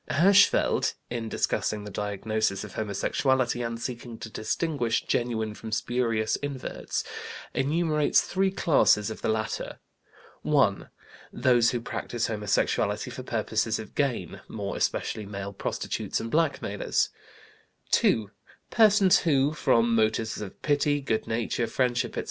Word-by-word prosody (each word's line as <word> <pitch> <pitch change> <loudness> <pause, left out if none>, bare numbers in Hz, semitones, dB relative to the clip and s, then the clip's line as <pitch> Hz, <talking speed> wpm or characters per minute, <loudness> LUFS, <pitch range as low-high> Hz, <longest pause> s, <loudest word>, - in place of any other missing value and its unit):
Hirschfeld, 195 +6 +4 0.2
in 115 -2 -3
discussing 105 -1 -1
the 105 - -8
diagnosis 105 0 -1
of 105 - -9
homosexuality 120 +4 0
and 115 -1 -3
seeking 120 -1 -6
to 110 - -8
distinguish 120 0 -1
genuine 110 -3 -1
from 110 +1 -8
spurious 115 -1 0
inverts, 140 -3 -4 0.5
enumerates 150 +2 +2
three 190 +1 0
classes 140 - +3
of - - -8
the - - -1
latter: 110 0 -2 0.6
(1) - - +2 0.4
those 120 -2 +3
who 120 - -1
practise 120 0 -3
homosexuality 105 -2 0
for - - -6
purposes - - -1
of - - -9
gain, - - -2
more 100 -2 -4
especially 105 -2 -1
male 100 0 -6
prostitutes - - -3
and 115 - -5
blackmailers; 145 -10 0 0.8
(2) 105 -2 +3 0.4
persons 210 -4 +5
who, 145 -2 +2
from 115 -6 +2
motives 110 -1 +1
of 100 -3 -8
pity, 145 0 +2
good 115 -6 -2
nature, 115 +1 -1
friendship, 125 +1 0
etc. - - +1
115 Hz, 125 wpm, -27 LUFS, 110-140 Hz, 0.8 s, persons